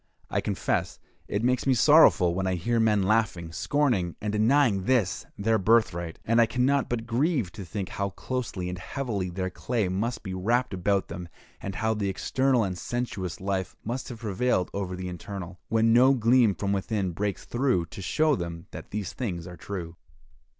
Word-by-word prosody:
I - - +1
confess - - -1 0.3
it 100 +2 -2
makes 125 +1 +1
me 130 - +4
sorrowful 125 - +6
when 95 +1 -1
I 95 - +1
hear 115 +7 0
men 105 -3 +3
laughing, 95 -5 +1
scorning, 115 - 0
and 105 0 -3
denying 110 -3 +3
this 105 -7 +1
their 110 +2 +2
birthright; 90 -5 +2
and 115 +1 +4
I 115 - +4
can 125 +2 +1
not 140 0 +2
but 115 -2 -2
grieve 120 - 0
to 105 -3 -8
think 95 +1 -5
how 100 0 -2
closely 100 -2 -4
and 90 0 -4
heavily 100 -3 -3
their 95 +1 -3
clay 110 -1 -1
must 115 +6 -2
be 95 -3 -5
wrapped 115 +6 0
about 95 +1 +1
them, 85 0 -7 0.3
and 95 -1 -5
how 110 +4 +1
the 105 -2 -1
external 130 +5 +1
and 95 -2 -2
sensuous 100 -8 -3
life 95 -1 -2
must 120 +4 -4
have 120 -2 -8
prevailed 105 -2 0
over 95 -2 -3
the 90 0 -5
internal, 90 +1 -7
when 115 0 +3
no 130 +3 +6
gleam 115 -3 +4
from 100 -1 -1
within 100 -1 -1
breaks 100 +3 -3
through 120 -9 +1
to 85 - -9
show 155 - +2
them 85 -4 -5
that - - -9
these 100 -3 -4
things 90 -9 -4
are 90 0 -8
true. 85 -3 -6
105 Hz, 185 wpm, -27 LUFS, 95-120 Hz, 0.3 s, sorrowful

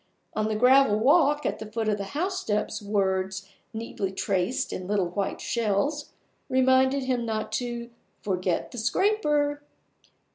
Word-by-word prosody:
On 215 0 0
the 215 - -1
gravel 250 -1 +5
walk 295 +4 +3
at - - -1
the 215 0 -8
foot 225 0 -2
of 210 -1 +1
the 200 - -3
housesteps 305 - -1
words, 190 -2 -1 0.2
neatly 220 -4 -4
traced 190 +6 -1
in 185 - -5
little 200 -3 0
white 195 +2 -2
shells, 235 +7 -1 0.4
reminded 260 +1 +3
him 255 -2 0
not 215 -1 -3
to 235 +1 -3 0.3
"forget 185 -3 -1
the 245 - -6
scraper". 295 - +1
225 Hz, 140 wpm, -26 LUFS, 205-265 Hz, 0.4 s, gravel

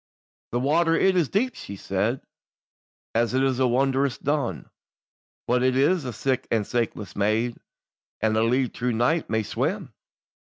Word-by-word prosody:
"The 120 - 0
water 165 +5 +2
it 190 +2 +3
is 170 -6 +2
deep," 250 +6 +1
she 100 - -8
said, 100 +6 -1 0.9
"As 115 +2 +1
it 130 - +3
is 130 -2 +1
wondrous 135 +1 +2
dun; 140 - -2 0.8
But 125 +1 +2
it 130 0 +2
is 170 +6 +3
sic 130 +2 -1
as 110 -3 -1
a - - +2
saikless 100 -4 -10
maid, 110 +4 0 0.6
And 110 0 +1
a 110 - +3
leal 125 +3 +2
true 125 0 -2
knight 120 +9 +1
may 110 0 +1
swim." 135 - -2
125 Hz, 155 wpm, -25 LUFS, 115-140 Hz, 0.9 s, it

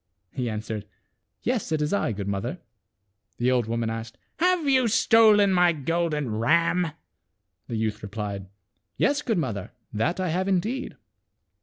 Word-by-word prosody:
He 125 -3 -2
an 105 -1 -3
swered, 110 -2 -5 0.6
"Yes, 245 -8 -1
it 155 - +1
is 150 +3 0
I, 200 - +1
good 100 -2 -4
mother." 100 -1 -2 0.8
The 125 +1 +2
old 120 -3 +1
woman 115 0 -1
asked, 115 0 -6
" - - -49
Have 355 -2 +2
you 260 -3 +4
stolen 215 -2 +5
my 175 -1 +4
golden 150 -5 -1
ram? 170 +6 +2 0.4
" 95 -4 -52
The 120 - -4
youth 110 -1 -2
replied, 100 -2 -5 0.3
" - - -50
Yes, 285 0 +2
good 235 -8 0
mother, 115 - -3 0.2
that 130 - 0
I 185 -2 0
have 185 +4 0
indeed." 215 +8 -1
150 Hz, 165 wpm, -26 LUFS, -, 0.8 s, stolen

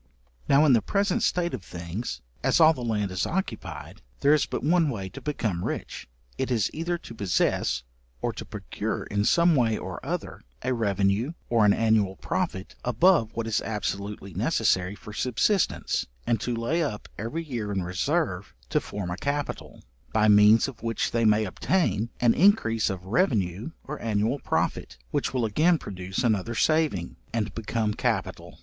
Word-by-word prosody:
Now, 140 +3 +6
in 140 - +6
the 115 - +4
present 200 - 0
state 175 -1 +1
of 120 -8 -5
things, 85 - -5 0.2
as - - +3
all 160 0 +7
the 130 - -7
land 105 -5 -1
is 95 - -1
occupied, 190 +3 -4 0.2
there 145 - +5
is 150 - +2
but - - -4
one 165 +1 +3
way 100 -7 -4
to - - -10
become 110 -12 -2
rich, - - -4 0.3
it - - -1
is 115 -5 +1
either 170 +2 -2
to 140 - -11
possess, 90 - 0 0.4
or - - -2
to - - -6
procure - - -4
in 100 0 -1
some 170 +4 +4
way 115 -5 +2
or - - -7
other, - - -4 0.2
a 130 +1 +1
revenue 100 - +1 0.2
or 115 -3 +4
an 100 - +6
annual 110 -4 +2
profit 95 +1 -3
above 125 - +3
what 115 0 -2
is 115 -2 0
absolutely 100 -2 -4
necessary 100 - +1
for 105 - -11
subsistence, 130 - +1 0.2
and 115 -3 +1
to 120 - -1
lay 120 +9 0
up 125 -10 -3
every 115 +10 -3
year 120 -9 -4
in 95 -2 -1
reserve 90 +1 -1 0.2
to - - +2
form 100 -4 -5
a 90 - -3
capital, 145 +4 -4 0.3
by 110 -1 +3
means 105 +3 +6
of 130 -4 -9
which 115 -1 -1
they 115 -1 +1
may 105 0 +4
obtain 115 - 0
an 120 -2 +4
increase 150 - +3
of 95 -2 -5
revenue 105 - 0
or 150 +2 -7
annual 110 +4 0
profit, - - -2
which - - 0
will 125 -3 0
again 155 +11 +3
produce 95 -4 -4
another 115 -1 +1
saving, 155 - +1
and 110 -2 -2
become 110 -1 -1
capital. - - -2
115 Hz, 170 wpm, -26 LUFS, 100-140 Hz, 0.4 s, all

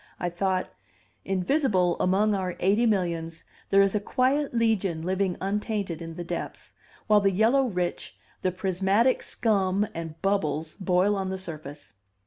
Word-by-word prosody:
I 175 - -1
thought, 185 +1 -1 0.6
"Invisible 190 - +1
among 200 +4 +2
our 185 -3 -2
eighty 205 +6 +3
millions 170 -5 -1 0.3
there 195 0 +6
is 195 - +1
a 210 - +1
quiet 265 +6 +1
legion 210 -8 0
living 185 0 0
untainted 200 -3 -2
in 165 -1 -7
the 175 - -5
depths, 175 0 -6 0.3
while 210 -1 +4
the 200 - +3
yellow 230 +8 +3
rich, 180 -5 -3 0.2
the 185 - +1
prismatic 195 +6 +1
scum 200 -3 +1
and 165 -1 -7
bubbles, 160 -6 0
boil 185 +2 +2
on 190 -1 -2
the 190 - -3
surface." 155 -5 -8
190 Hz, 145 wpm, -26 LUFS, 175-210 Hz, 0.6 s, there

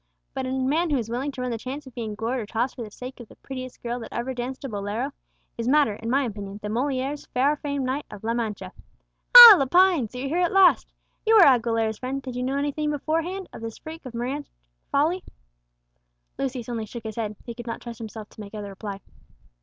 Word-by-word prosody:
But 260 -1 -3
a - - -3
man 275 +6 +1
who 290 - +2
is 230 -2 -4
willing 265 +4 -2
to 255 - -6
run 250 -1 -2
the 230 - -3
chance 275 +5 -6
of 260 - -12
being 225 -3 -5
gored 230 +4 -2
or 215 - -5
tossed 235 +4 -1
for 250 - -7
the 220 - -6
sake 250 +5 -9
of 240 - -10
the - - -16
prettiest 255 -1 -8
girl 240 +1 -3
that 230 - -9
ever 240 +2 -3
danced 255 +2 -5
a - - -2
bolero, 210 +4 -3 0.5
is 230 - -2
madder, 285 -4 +4
in 225 +3 -6
my 275 +3 +2
opinion, 205 -4 -6
than 210 - -3
Molière's 270 +4 -2
far 275 +4 +3
famed 280 -2 -3
knight 265 +3 -2
of 210 - -11
La 230 +1 0
Mancha. 225 -3 -3 0.7
Ah! 470 -4 +14
Lepine, 330 - +4
so 250 - -10
you're 265 +2 -3
here 335 +5 0
at 350 -1 +2
last. 385 -2 +5 0.3
You 450 0 +4
are 405 -5 +9
Aguilera's 230 -4 +2
friend; 265 +2 -3
did 260 -2 -7
you 250 - -2
know 265 +2 -1
anything 290 +1 -1
beforehand 330 +6 -2
of - - -9
this 225 -1 -6
freak 320 +1 -10
of 255 -3 -9
romantic 260 +5 -4 0.4
folly?" 325 +6 +1 1.2
Lucius 260 -3 -3
only 230 -3 -4
shook 235 +1 -8
his 220 +1 -7
head; 215 -2 -3
he 235 - -6
could 240 0 -10
not 230 - -4
trust 235 -2 -9
himself 220 -1 -8
to - - -12
make 205 +1 -9
other 205 -1 -6
reply. 195 0 -7
255 Hz, 230 wpm, -25 LUFS, 225-280 Hz, 1.2 s, Ah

